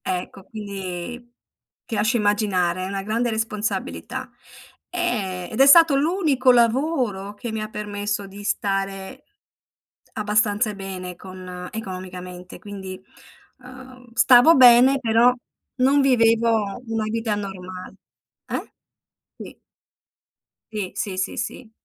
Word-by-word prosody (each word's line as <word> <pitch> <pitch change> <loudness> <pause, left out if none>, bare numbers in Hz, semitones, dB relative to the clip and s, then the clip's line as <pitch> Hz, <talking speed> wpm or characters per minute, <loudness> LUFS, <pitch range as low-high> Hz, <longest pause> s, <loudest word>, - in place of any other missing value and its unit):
Ecco, 185 +1 -5
quindi 205 +3 -7 0.5
ti - - -6
lascio 220 +4 +2
immaginare, 200 -4 +1
è - - -3
una 195 0 -4
grande 230 +4 -1
responsabilità. 220 -1 -3 0.6
Ehm, 205 - -2
ed 220 - -3
è 270 - +8
stato 320 -1 +7
l'unico 290 -5 +3
lavoro 235 -5 +1
che 230 +3 -6
mi 220 0 -3
ha 215 - -4
permesso 205 -1 -4
di 200 +1 -11
stare 195 +5 -3 0.9
abbastanza 210 0 +1
bene 185 -2 -7
con 185 -1 -9
economicamente, 185 -3 -8
quindi, 190 -3 -8 0.6
uhm, 255 -1 -14
stavo 255 +7 +7
bene 255 +2 +7
però 235 +1 +4 0.4
non 270 +3 +3
vivevo 230 -4 +2
una 225 -1 -1
vita 225 0 -1
normal 185 -2 -7 0.5
eh? - - -5 0.7
Sì. - - -11 1.1
Sì, 205 -4 -3
sì, 195 -3 -3
sì, 185 - -2
sì. 230 0 -5
215 Hz, 115 wpm, -23 LUFS, 195-245 Hz, 1.1 s, è